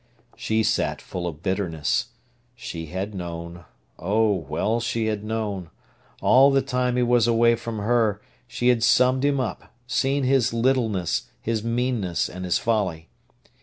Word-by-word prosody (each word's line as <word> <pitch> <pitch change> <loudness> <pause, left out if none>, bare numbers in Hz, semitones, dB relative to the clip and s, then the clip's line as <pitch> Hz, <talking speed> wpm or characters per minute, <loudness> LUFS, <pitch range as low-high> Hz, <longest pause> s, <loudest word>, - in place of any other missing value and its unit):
She 110 0 0
sat 105 0 0
full 90 -1 -5
of 80 -1 -7
bitterness. 85 -5 -1 0.5
She 85 -8 -7
had 95 +6 -4
known—oh, 85 +4 -3 0.2
well 115 +2 0
she 115 -1 -1
had 105 -2 -2
known! 105 -5 -3 0.5
All 135 +2 +6
the 135 -1 +2
time 125 -2 0
he 125 - +2
was 120 -1 +3
away 115 0 +4
from 115 -1 -6
her 110 -1 +1 0.3
she 125 0 0
had 120 -2 +3
summed 130 +2 +4
him 140 -1 +2
up, 110 -8 -4
seen 135 +3 0
his 130 -3 +2
littleness, 115 -7 0
his 110 -2 -2
meanness, 115 -6 -1
and 90 0 -7
his 90 - +2
folly. 95 -8 -1
110 Hz, 145 wpm, -24 LUFS, 95-125 Hz, 0.5 s, All